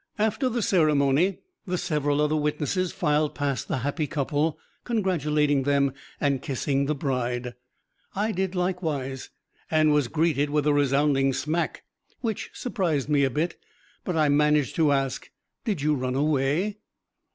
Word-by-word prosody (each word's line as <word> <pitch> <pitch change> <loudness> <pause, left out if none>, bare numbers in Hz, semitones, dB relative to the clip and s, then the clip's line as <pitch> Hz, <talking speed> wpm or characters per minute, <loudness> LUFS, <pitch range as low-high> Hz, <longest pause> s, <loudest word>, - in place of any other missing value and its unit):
After 220 +5 +1
the 235 -2 -1
ceremony, 155 0 +2 0.3
the 180 0 -1
several 145 -3 0
other 150 +1 +2
witnesses 150 +4 0
filed 150 0 0
past 140 -2 -2
the - - -1
happy 150 +1 -1
couple, 150 +1 -1 0.3
congratulating 150 - +1
them 140 0 +2 0.3
and 140 -2 +1
kissing 140 0 -1
the 150 - 0
bride. 125 -3 -2 0.6
I 210 +3 0
did 190 -1 -2
likewise, 160 -8 -2 0.4
and 155 -1 +4
was 145 -4 +2
greeted 150 0 +1
with 150 0 +1
a 150 - +4
resounding 140 -1 +2
smack 155 +6 -2 0.4
which 225 -4 -3
surprised 170 - -1
me 145 -2 +3
a 135 - +3
bit, 160 +6 -2 0.5
but 180 - -2
I 155 -2 +3
managed 150 -1 +3
to 155 -3 +4
ask, 135 -2 -1 0.4
"Did 195 -10 -1
you 150 0 +3
run 130 -2 -2
away?" 150 +8 +1
150 Hz, 145 wpm, -26 LUFS, 140-170 Hz, 0.6 s, and